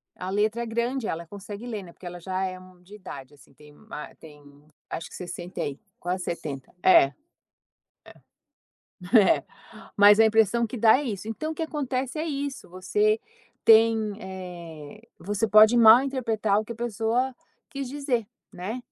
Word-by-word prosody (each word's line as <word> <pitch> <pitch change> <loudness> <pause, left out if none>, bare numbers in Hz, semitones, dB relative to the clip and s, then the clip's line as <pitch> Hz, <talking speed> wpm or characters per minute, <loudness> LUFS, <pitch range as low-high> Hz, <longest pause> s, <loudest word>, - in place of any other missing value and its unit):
a 185 - -6
letra 215 +4 0
é - - -4
grande, 235 +1 -2
ela 170 +1 -4
consegue 205 +4 -9
ler, 215 -5 -5
né, 170 -2 -13
porque - - -16
ela 175 0 -7
já 185 +2 -3
é, 185 -1 -4
hum, 185 -1 -17
de 200 +4 -14
idade, 145 -9 -10
assim, 140 - -21
tem, 150 -1 -18
hum, 220 - -21
ah, 150 - -7
tem 150 -2 -14 0.5
acho 165 - -5
que - - -12
60 175 0 -7
e 140 -1 -6 0.2
quase 180 +1 -3
70. 140 -6 -6
É. 185 - +7 2.1
É. 230 - +9 0.2
É. - - -12 0.5
Mas 205 +1 +7
a 225 - +7
impressão 225 +1 +3
que 235 - -7
dá 220 +2 +6
é 290 - -3
isso, 210 -5 -5
então 310 +8 -4
o - - -7
que 325 - -2
acontece 270 -2 -3
é 315 - -2
isso, 280 - -5
você 210 +4 +1 0.5
tem, 225 0 +6 0.3
eh, 175 -2 -9 0.2
você 205 +3 -1
pode 215 +2 +7
mal 230 +2 +8
interpretar 225 -6 0
o 215 - -5
que 235 - -6
a - - -14
pessoa 235 +3 -1 0.4
quis 275 -2 -5
dizer, 260 -5 -2 0.2
né? 190 +7 -5
215 Hz, 180 wpm, -26 LUFS, 185-235 Hz, 2.1 s, É